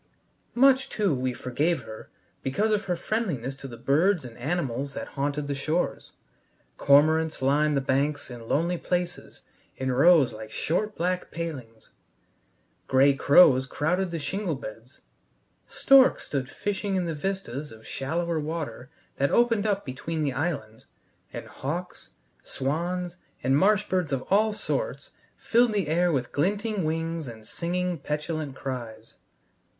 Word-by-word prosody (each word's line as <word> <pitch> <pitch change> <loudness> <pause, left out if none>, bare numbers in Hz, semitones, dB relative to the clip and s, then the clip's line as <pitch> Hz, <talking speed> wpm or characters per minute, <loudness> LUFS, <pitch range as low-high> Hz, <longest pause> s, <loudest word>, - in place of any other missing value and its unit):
Much, 265 +1 +5
too, 205 -7 +1
we 130 -1 -1
forgave 130 +5 -1
her 110 0 -10 0.3
because 205 +12 0
of 210 -1 +1
her 180 -2 0
friendliness 170 - -2
to 135 0 -9
the 120 -3 -9
birds 155 - +2
and 120 -2 -9
animals 140 -2 -2
that - - -5
haunted 145 +1 -2
the 140 - -2
shores. 155 +5 -2 0.7
Cormorants 155 +3 +4
lined 145 +2 +2
the - - +1
banks 140 +1 -1
in 115 -2 -9
lonely 170 +6 0
places 175 -1 -3 0.3
in 130 0 -1
rows 140 -1 +5
like 110 0 -8
short 210 - -1
black 180 +2 -1
palings; 130 -10 -7 1.0
gray 135 +2 +5
crows 135 -2 +6
crowded 180 +7 0
the 170 - -3
shingle 180 +2 -2
beds; 120 +1 -10 0.7
storks 270 -1 +5
stood 135 -2 -3
fishing 205 +2 -2
in 185 -2 0
the 165 - -2
vistas 150 -5 -4
of 110 0 -14
shallower 165 +4 -2
water 150 -5 -5 0.3
that 140 +1 +2
opened 230 -3 +3
up 200 -1 0
between 155 +4 -3
the 140 -3 0
islands, 130 -8 -3 0.4
and - - -7
hawks, 170 +7 -6 0.3
swans, 175 +5 -3 0.3
and 130 +2 +3
marsh 205 +6 +3
birds 180 -6 0
of 135 -2 -1
all 215 +2 +4
sorts - - -3 0.3
filled 235 -1 +3
the 200 -6 0
air 175 +3 +2
with 130 -5 -1
glinting 205 +4 0
wings 165 -1 -2
and 110 -2 -10
singing, 180 +4 -2
petulant 150 -1 -3
cries. 115 -5 -6
155 Hz, 145 wpm, -26 LUFS, 135-180 Hz, 1.0 s, crows